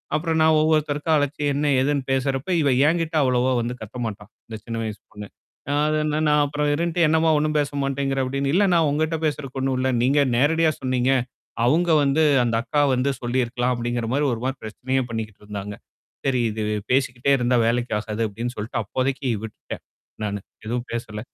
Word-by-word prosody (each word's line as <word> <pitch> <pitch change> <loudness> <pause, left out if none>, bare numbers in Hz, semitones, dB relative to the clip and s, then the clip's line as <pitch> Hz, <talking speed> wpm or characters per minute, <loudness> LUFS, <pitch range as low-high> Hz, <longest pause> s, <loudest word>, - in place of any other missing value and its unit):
அப்புறம் 160 +1 0
நான் 160 0 +5
ஒவ்வொருத்தருக்கும் 155 0 +1
அழைச்சு, 145 0 -1
என்ன 145 +2 -1 0.2
எதுன்னு 140 0 0
பேசுறப்ப 135 +2 -1
இவ 145 - +2 0.2
என்கிட்ட 165 0 0
அவ்வளவா 125 0 +2
வந்து 120 +1 -3
கத்த 110 +3 -8
மாட்டா. 105 -2 -5 0.2
இந்த 110 - -7
சின்ன 115 -1 -4
வயசு 105 -2 -5
பொண்ணு. 105 0 -8 0.4
அ - - +1
அதுன்னா, 155 0 0
நான் 150 0 +4
அப்புறம் 145 +1 -1
இருந்துட்டு, 170 +2 +1
"என்னம்மா 160 +1 +3
ஒண்ணும் 155 +1 0
பேச 145 -1 0
மாட்டேங்கிற" 135 0 -1
அப்பிடீன்னு. 140 +1 -1
"இல்லண்ணா, 200 +1 +4
நான் 165 -2 +4
உங்கிட்ட 160 +2 0
பேசுறதுக்கு 140 -3 -3
ஒண்ணும் 130 -1 0
இல்ல. 130 +1 +1
நீங்க 140 +3 +3 0.2
நேரடியா 160 +4 +3
சொன்னீங்க. 130 0 +1 0.5
அவுங்க 165 +7 +3
வந்து 140 +3 +2 0.2
அந்த 115 -1 0
அக்கா 145 +2 +1
வந்து 125 +3 +1
சொல்லியிருக்கலாம்." 120 0 0
அப்டிங்கிற 120 -1 -2
மாரி 145 +2 +1
ஒரு 115 - -5
மாரி 135 +1 -2
பிரச்சனையே 130 +4 -2
பண்ணிக்கிட்டு 110 -3 -6
இருந்தாங்க. 105 0 -6 0.5
சரி 130 -2 +2
இது 110 0 -3 0.3
பேசிக்கிட்டே 130 0 +1
இருந்தா, 125 0 +2
வேலைக்கு 120 +1 0
ஆகாது 105 +1 -4
அப்டின்னு 120 +4 -5
சொல்லிட்டு 105 +2 -3
அப்போதைக்கு 130 +5 -2
விட்டுட்டேன், 110 - -8 0.4
நானு. 105 -1 -2 0.3
எதுவும் 120 +2 -3
பேசல. 110 -2 -4
135 Hz, 175 wpm, -23 LUFS, 120-150 Hz, 0.5 s, நான்